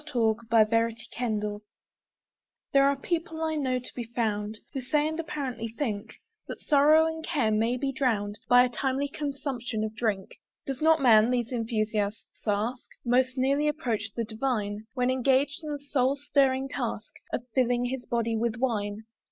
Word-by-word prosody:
K. - - -27
Stephen 225 -3 +3 0.3
Drinking 230 0 -1
Song 210 0 -4 1.1
THERE 275 0 +6
are 280 - +1
people, 325 +2 -3
I 320 0 0
know, 265 -4 0
to 250 - -8
be 245 - -4
found, 215 -2 -2 0.2
Who 270 - -3
say, 295 +4 +1
and 315 +1 -3
apparently 265 -8 -3
think, 220 -3 -4 0.3
That - - -6
sorrow 300 +2 +5
and 320 0 -3
care 270 -11 +1
may 225 +3 +1
be 270 +1 -1
drowned 220 -6 -1
By 245 0 +8
a 250 - +1
timely 270 +3 -1
consumption 275 -6 -3
of 220 0 -4
drink. 210 -5 -2 0.3
Does 270 0 -4
not 320 -1 +4
man, 225 -2 +6
these 245 -1 0
enthusiasts 215 -3 -2
ask, 215 +5 -1 0.2
Most 255 +2 +2
nearly 275 +3 +2
approach 235 -8 -1
the 230 - -1
divine, 220 -2 -2
When 250 0 +2
engaged 270 +4 +1
in 305 - -5
the 295 - -2
soul 275 -2 +1
stirring 270 -2 +2
task - - -4 0.2
Of 240 - -2
filling 245 -1 +2
his 250 0 -4
body 230 -1 0
with 225 0 0
wine? 215 -4 -1
250 Hz, 170 wpm, -28 LUFS, 220-275 Hz, 1.1 s, By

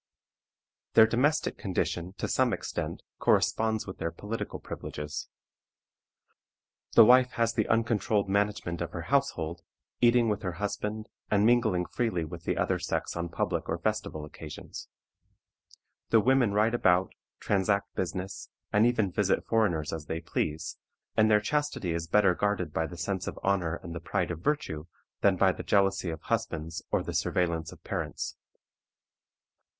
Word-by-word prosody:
Their 110 - +9
domestic 140 +7 +1
condition, 90 -2 -2
to - - -2
some 130 -3 +2
extent, 90 - -4 0.2
corresponds 110 -1 +2
with 95 - -8
their 85 - -1
political 105 +7 -5
privileges. 75 +1 -6 1.7
The - - +9
wife 125 +2 +6
has 115 0 +1
the - - 0
uncontrolled 110 -2 +1
management 100 -4 0
of 85 - -4
her 85 - -4
household, 85 - 0 0.4
eating 120 -1 +5
with 105 -2 0
her 90 -4 -3
husband, 105 +3 -3 0.2
and 105 0 +3
mingling 110 -7 +3
freely 90 -9 -1
with 85 +1 -9
the - - 0
other - - +1
sex - - -2
on 85 0 -3
public 85 - -2
or - - 0
festival 75 -1 -2
occasions. 75 0 -9 1.2
The 115 - +6
women 125 -1 +3
ride 105 +3 +2
about, 90 -5 +3 0.3
transact 100 0 +1
business, 95 +1 -4 0.2
and 105 +3 +5
even 110 -6 +1
visit 100 +1 +1
foreigners 90 -10 +1
as 80 -2 -5
they 80 - -2
please, 80 -1 -3 0.4
and 110 0 +4
their 105 -1 +6
chastity 145 - -1
is 85 0 -2
better 95 +1 +4
guarded 95 -4 -1
by 80 0 0
the 85 - -9
sense 95 +1 -2
of - - -4
honor 90 -4 +1
and 85 -2 -7
the 85 - -4
pride 85 - -1
of 80 - -5
virtue, 85 - -1 0.3
than 100 -2 +4
by 95 +1 +5
the - - -6
jealousy 95 -2 +2
of 80 -1 -5
husbands 80 +2 -2
or - - +1
the - - -5
surveillance 85 -3 0
of - - -15
parents. - - -4
95 Hz, 155 wpm, -29 LUFS, 85-110 Hz, 1.7 s, Their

